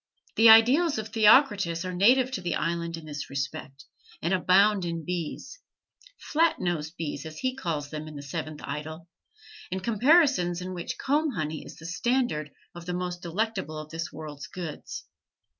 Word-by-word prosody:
The 225 Hz, -, +6 dB
idyls 255 Hz, +8 st, +6 dB
of 220 Hz, 0 st, -4 dB
Theocritus 210 Hz, -, +4 dB
are 185 Hz, -, -4 dB
native 245 Hz, +8 st, +4 dB
to 210 Hz, -, -3 dB
the 175 Hz, -, -1 dB
island 170 Hz, 0 st, -2 dB
in 165 Hz, -, -10 dB
this 145 Hz, -2 st, -6 dB
respect, 135 Hz, 0 st, -5 dB, 0.3 s
and 170 Hz, +3 st, -1 dB
abound 190 Hz, +2 st, +4 dB
in 170 Hz, -2 st, -4 dB
bees 180 Hz, -, -5 dB, 0.6 s
"Flat 325 Hz, +2 st, +1 dB
nosed 165 Hz, -2 st, -3 dB
bees" 145 Hz, -3 st, -4 dB
as 155 Hz, -1 st, -9 dB
he 255 Hz, 0 st, -2 dB
calls 155 Hz, -, -3 dB
them 155 Hz, 0 st, -6 dB
in 155 Hz, -, -9 dB
the 145 Hz, -, -7 dB
Seventh 155 Hz, +1 st, -5 dB
Idyl 155 Hz, +4 st, -6 dB, 0.6 s
and 190 Hz, 0 st, -3 dB
comparisons 235 Hz, -, +3 dB
in 185 Hz, +1 st, -5 dB
which 175 Hz, -1 st, -5 dB
comb 295 Hz, +1 st, 0 dB
honey 155 Hz, -4 st, -3 dB
is -, -, -11 dB
the 165 Hz, -, -12 dB
standard 180 Hz, -, 0 dB, 0.2 s
of 175 Hz, 0 st, -10 dB
the 180 Hz, -, -2 dB
most 180 Hz, -1 st, -4 dB
delectable 190 Hz, -2 st, -2 dB
of 155 Hz, 0 st, -8 dB
this 165 Hz, 0 st, -4 dB
world's 150 Hz, -3 st, -8 dB
goods. 165 Hz, 0 st, -7 dB
175 Hz, 170 wpm, -27 LUFS, 155-220 Hz, 0.6 s, The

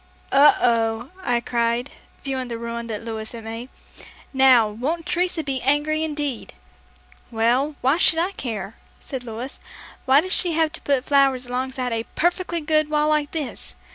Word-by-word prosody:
"Oh, 285 Hz, +2 st, +7 dB
oh," 230 Hz, 0 st, +1 dB
I 240 Hz, -8 st, 0 dB
cried, 235 Hz, +2 st, -1 dB, 0.3 s
viewing 265 Hz, -2 st, -3 dB
the 235 Hz, -1 st, -5 dB
ruin 235 Hz, 0 st, -5 dB
that 220 Hz, -1 st, -5 dB
Louis 220 Hz, -1 st, -5 dB
had 230 Hz, -1 st, -8 dB
made. 225 Hz, +3 st, -7 dB, 0.6 s
"Now, 260 Hz, -4 st, +6 dB
won't 280 Hz, +11 st, -3 dB
Teresa 350 Hz, 0 st, 0 dB
be 270 Hz, -3 st, -2 dB
angry 295 Hz, +3 st, +1 dB
indeed!" 295 Hz, -5 st, -4 dB, 0.7 s
"Well, 245 Hz, +6 st, +1 dB
why 270 Hz, +6 st, +2 dB
should 325 Hz, -, +4 dB
I 350 Hz, +4 st, +1 dB
care?" 220 Hz, -, -5 dB, 0.3 s
said 260 Hz, -2 st, -6 dB
Louis. 240 Hz, +3 st, -7 dB, 0.5 s
"Why 265 Hz, +2 st, +6 dB
did 370 Hz, +4 st, -3 dB
she 350 Hz, -3 st, +4 dB
have 320 Hz, -1 st, +2 dB
to 340 Hz, -, -6 dB
put 275 Hz, -2 st, 0 dB
flowers 270 Hz, -3 st, +3 dB
alongside 255 Hz, 0 st, -3 dB
of 225 Hz, -, 0 dB
a 225 Hz, -, -5 dB
perfectly 345 Hz, 0 st, 0 dB
good 310 Hz, 0 st, +1 dB
wall 300 Hz, 0 st, +2 dB
like 300 Hz, -1 st, +1 dB
this? 300 Hz, -6 st, -5 dB
265 Hz, 170 wpm, -23 LUFS, 235-305 Hz, 0.7 s, Oh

